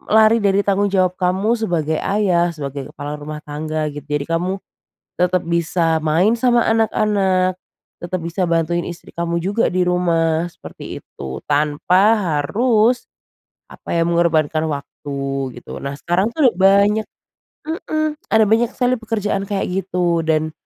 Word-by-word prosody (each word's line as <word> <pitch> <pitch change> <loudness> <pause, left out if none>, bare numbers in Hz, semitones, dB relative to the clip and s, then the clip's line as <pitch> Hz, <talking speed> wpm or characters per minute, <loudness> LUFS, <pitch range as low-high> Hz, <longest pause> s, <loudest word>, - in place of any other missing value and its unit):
lari 220 +1 +6
dari 200 -1 +3
tanggung 200 0 +2
jawab 185 -2 +2
kamu 190 +5 +1
sebagai 170 -9 -1
ayah, 180 -4 +1
sebagai 140 -2 -6
kepala 145 +1 -6
rumah 150 +1 -7
tangga 155 +1 -3
gitu 145 -1 -8
jadi 145 0 -2
kamu, 185 +3 -2 0.6
tetap 180 0 +2
bisa 165 -1 +1
main 160 +7 +2
sama 240 -1 +3
anak-anak, 195 -4 +1 0.4
tetap 180 +1 -3
bisa 175 +2 -1
bantuin 170 +1 0
istri 175 -1 -9
kamu 170 0 -2
juga 205 +5 +1
di 180 0 +1
rumah 170 -2 +1
seperti - - -9
itu 65 -1 -8
tanpa 150 +5 +2 0.4
harus, 225 - +2 0.7
apa - - -16
ya 165 - +3
mengorbankan 160 -2 +1
waktu 145 0 -6 0.4
gitu 120 - -9
nah 140 0 -5
sekarang 175 +7 0
tuh 265 -3 +3
udah - - -18
banyak 200 +3 +4 0.6
mhm, 310 -1 -2
ada 220 0 +6
banyak 230 +1 +3
sekali 250 0 +1
pekerjaan 210 -3 -2
kayak 195 -1 -2 0.2
gitu 175 -3 0
dan, 155 0 +1
180 Hz, 140 wpm, -19 LUFS, 160-205 Hz, 0.7 s, lari